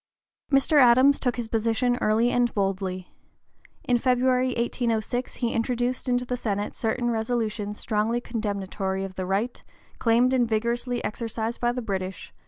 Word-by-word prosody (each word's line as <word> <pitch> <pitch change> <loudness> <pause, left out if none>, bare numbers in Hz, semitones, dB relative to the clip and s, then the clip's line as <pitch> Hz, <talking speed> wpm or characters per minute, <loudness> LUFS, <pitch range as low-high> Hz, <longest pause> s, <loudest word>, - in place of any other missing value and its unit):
Mr. 275 +2 +4
Adams 255 +3 +6
took 245 -3 0
his 240 -2 -4
position 230 +2 +1
early 225 +3 +3
and 245 -1 +2
boldly. 190 -2 -2 0.7
In 245 -1 +2
February, 255 0 +2
1806, 235 0 -1
he 235 -2 -1
introduced 245 +2 -1
into 245 0 +1
the 250 - -2
Senate 205 -4 -2
certain 240 +1 -1
resolutions 220 -2 -2
strongly 220 +2 0
condemnatory 200 -4 -3
of 195 -1 -6
the 185 0 -4
right, 205 +6 -1 0.4
claimed 240 +2 +3
and 245 -3 +2
vigorously 235 +2 -1
exercised 225 +1 -3
by 240 0 +2
the 245 0 -4
British, 190 -3 -4
(p. - - -33
235 Hz, 150 wpm, -25 LUFS, 210-245 Hz, 0.7 s, Adams